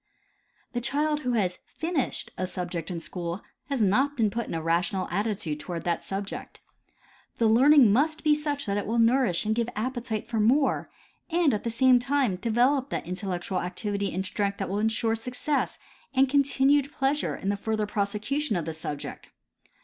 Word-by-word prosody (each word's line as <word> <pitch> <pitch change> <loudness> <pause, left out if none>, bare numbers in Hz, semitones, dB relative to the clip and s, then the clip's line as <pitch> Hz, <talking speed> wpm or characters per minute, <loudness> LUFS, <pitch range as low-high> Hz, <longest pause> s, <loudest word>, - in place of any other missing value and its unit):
The 240 - -1
child 295 +4 0
who 250 -4 -1
has 185 -6 0 0.2
finished 320 -5 -1
a 185 - -2
subject 180 -1 -4
in 175 -2 -3
school 170 +3 -4 0.3
has 270 -5 +1
not 265 +9 +2
been 220 -3 +2
put 235 +2 -3
in - - -4
a - - -1
rational 175 +3 0
attitude 195 -5 -2
toward 170 +1 -5
that 170 -1 -1
subject. 195 +1 -5 0.8
The 230 - +2
learning 245 0 +6
must 310 +6 +1
be 305 -1 +5
such 295 -1 -2
that 200 -1 -1
it 205 - -2
will 230 +2 0
nourish 230 -5 +3
and 215 - +2
give 235 +1 0
appetite 230 -1 -3
for 230 -2 -1
more, 260 +7 +2 0.4
and 335 -4 +3
at 210 - -2
the 235 - -1
same 250 +2 +5
time 255 -6 +1
develop 245 +6 +2
that - - -3
intellectual 185 0 -3
activity 200 +2 -2
and 190 +2 -2
strength 200 0 -1
that 195 - -3
will 200 +2 -1
insure 225 +1 +1
success 250 +6 -2 0.4
and 265 +1 +5
continued 280 +1 +3
pleasure 275 +2 0
in 195 - -3
the 205 - +1
further 215 +1 -1
prosecution 210 +6 -1
of 170 -3 -1
the 160 - -3
subject. 150 -2 -6
225 Hz, 180 wpm, -27 LUFS, 195-270 Hz, 0.8 s, learning